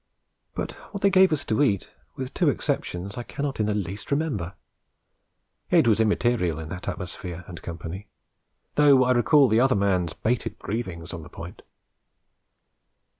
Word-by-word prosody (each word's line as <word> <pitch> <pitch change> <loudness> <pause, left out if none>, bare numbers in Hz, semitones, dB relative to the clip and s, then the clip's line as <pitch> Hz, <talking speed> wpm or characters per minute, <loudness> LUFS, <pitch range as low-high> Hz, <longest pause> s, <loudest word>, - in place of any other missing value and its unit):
But - - -3 0.2
what 200 - -6
they 200 - +5
gave 190 -1 +6
us 155 -2 -1
to 110 +6 +1
eat, 100 -10 +2 0.3
with 130 -1 -5
two - - +3
exceptions, 95 +5 -2
I - - -2
cannot 140 +2 -4
in 105 - +2
the 105 - 0
least 100 +1 -4
remember; 135 - -1 1.1
it - - +5
was 110 -1 +4
immaterial 110 -6 +2
in 80 -1 -7
that 90 +1 -7
atmosphere 90 -1 -5
and 85 -2 -9
company, 85 +4 -7 0.7
though 140 -3 +6
I 125 - +2
recall 135 +3 +5
the 110 0 +3
other 130 +1 +4
man's 95 -5 +1
bated 120 +1 -1
breathings 95 -6 -5
on 85 - -6
the 80 - -12
point. - - -9
105 Hz, 160 wpm, -25 LUFS, 90-130 Hz, 1.1 s, gave